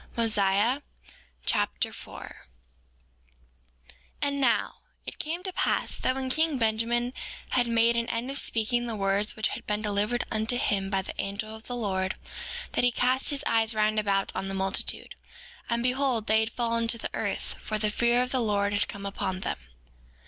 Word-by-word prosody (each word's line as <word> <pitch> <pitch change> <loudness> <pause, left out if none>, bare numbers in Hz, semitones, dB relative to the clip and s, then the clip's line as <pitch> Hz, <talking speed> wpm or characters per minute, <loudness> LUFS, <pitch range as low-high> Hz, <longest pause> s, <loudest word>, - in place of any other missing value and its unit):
Mosiah 215 +3 +3 0.6
Chapter - - 0
4 - - -10 1.4
4:1 - - -18 0.3
And 280 0 +1
now, 255 - +2 0.3
it - - -6
came 335 +4 -3
to 375 -1 -3
pass - - +1
that 255 - +1
when 265 -1 -2
king 315 0 +2
Benjamin 235 +2 +1 0.4
had 245 -1 +2
made 230 0 +4
an 235 0 0
end 235 +3 -1
of 280 - +2
speaking 240 +2 +1
the 230 - -2
words 200 +1 +1
which 220 - +1
had - - -7
been 210 +1 0
delivered 210 +3 +1
unto 220 +3 +1
him 195 -5 +1
by 195 -1 +1
the - - -6
angel 215 +2 -4
of 220 - -12
the 245 - -2
Lord, 190 -4 -1 0.6
that - - +1
he 245 - +6
cast 255 +2 +2
his 285 -1 -1
eyes 225 0 +3
round 215 0 +3
about 195 -2 +1
on 195 - -2
the 195 - -3
multitude, 190 0 0 0.6
and 235 0 +1
behold 250 -3 +2
they 220 0 +4
had 220 +1 0
fallen 230 -1 0
to 230 - +2
the - - -5
earth, - - -2
for 215 - -1
the 210 0 +1
fear 240 +2 +3
of 250 - -4
the 260 - +2
Lord 205 -2 +1
had 205 - +1
come 200 0 -7
upon 190 -1 -2
them. - - -2
225 Hz, 185 wpm, -28 LUFS, 205-245 Hz, 1.4 s, he